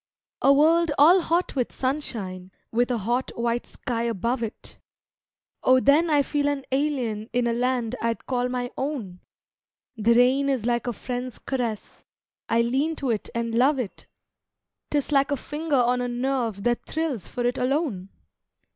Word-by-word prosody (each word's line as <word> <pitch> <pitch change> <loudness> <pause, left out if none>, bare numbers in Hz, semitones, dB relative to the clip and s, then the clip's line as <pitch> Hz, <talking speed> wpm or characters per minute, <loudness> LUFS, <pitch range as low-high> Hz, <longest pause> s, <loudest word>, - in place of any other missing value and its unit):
A 275 - +6
world 325 +4 +4
all 345 +6 +7
hot 340 +1 0
with 250 -3 -1
sunshine, 215 -10 -3 0.2
with 240 +2 +1
a 245 - 0
hot, 240 +5 -1
white 235 0 -1
sky 235 -3 -4
above 235 +2 -1
it 225 -2 -6 0.8
Oh 255 0 +5
then 295 +6 +4
I 290 -2 +4
feel 290 +1 0
an 285 -2 -1
alien 255 -6 -1
in 245 0 +1
a 235 - +1
land 245 -1 0
I'd 230 0 -2
call 250 -1 -1
my 245 -1 -3
own; 250 -11 -4 0.8
The 230 +1 +3
rain 260 +3 +4
is 260 -5 0
like 240 -1 0
a 245 - -1
friend's 250 +2 -5
caress, 240 -5 -4 0.4
I 230 +1 +3
lean 275 +7 0
to 270 -5 -1
it 215 - -3
and 230 -1 -2
love 265 +5 +3
it, 240 -7 -5 0.8
'Tis 290 0 -1
like 275 0 +3
a 285 - 0
finger 300 +2 -3
on 250 -1 +3
a 245 - -1
nerve 240 -4 -2
that 240 0 0
thrills 310 - -2
for 245 - -3
it 245 +2 0
alone! 250 - -1
250 Hz, 165 wpm, -25 LUFS, 235-280 Hz, 0.8 s, all